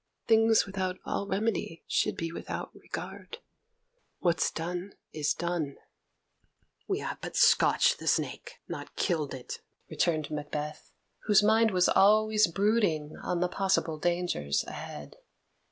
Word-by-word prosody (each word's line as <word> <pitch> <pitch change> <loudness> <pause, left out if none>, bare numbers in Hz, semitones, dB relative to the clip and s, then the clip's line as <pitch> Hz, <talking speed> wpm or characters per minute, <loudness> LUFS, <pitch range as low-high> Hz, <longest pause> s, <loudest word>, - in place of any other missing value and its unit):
Things 225 0 +5
without 190 -2 -3
all 200 - -2
remedy 195 -5 -2
should - - 0
be 165 0 -3
without - - -6
regard; 465 - -8 0.8
what's 170 -2 +1
done 175 +4 -5 0.2
is 150 -1 0
done." 170 -5 -2 1.1
"We 390 - 0
have - - -5
but - - -6
scotched 485 0 +4
the - - -7
snake, - - -1
not - - -7
killed 155 -7 -1
it," 125 - -8 0.3
returned 155 -4 0
Macbeth, 150 0 -5 0.3
whose 210 -1 +5
mind 220 +2 +4
was 180 -3 +3
always 215 +1 +5
brooding 195 -7 +1
on 175 -1 -2
the 180 - +3
possible 180 -4 0
dangers 175 - 0
ahead. 75 -1 -8
180 Hz, 125 wpm, -29 LUFS, 155-210 Hz, 1.1 s, Things